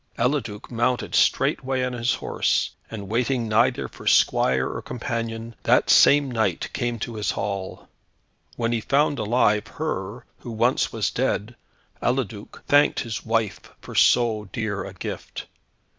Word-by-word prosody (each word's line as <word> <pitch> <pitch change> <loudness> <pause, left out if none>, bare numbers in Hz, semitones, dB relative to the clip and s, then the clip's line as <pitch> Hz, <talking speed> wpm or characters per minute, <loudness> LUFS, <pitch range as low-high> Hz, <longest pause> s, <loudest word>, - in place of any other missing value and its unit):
Eliduc 120 -4 -2
mounted 120 +1 0
straightway 130 0 +2
on 125 0 -2
his 120 +1 0
horse, - - 0 0.2
and 105 -3 -7
waiting 120 +2 0
neither 110 - +2
for - - -12
squire 65 0 +3
or - - -5
companion, 115 -1 -4
that - - +3
same 140 -2 +6
night 110 -7 -1
came 120 -2 -2
to 115 +2 -5
his 105 -2 -2
hall. 100 -2 -4 0.7
When 115 -1 -1
he 115 -1 0
found 145 +3 +1
alive, 105 -1 +2
her, 120 -6 -4
who - - -9
once 120 +4 +1
was - - -1
dead, 110 +4 -1 0.5
Eliduc 120 -5 -3
thanked 145 +1 +4
his 115 -3 -5
wife 115 -2 0 0.2
for - - -11
so 110 -4 +3
dear 110 -4 -3
a - - -8
gift. - - -6
115 Hz, 145 wpm, -24 LUFS, 105-125 Hz, 0.7 s, same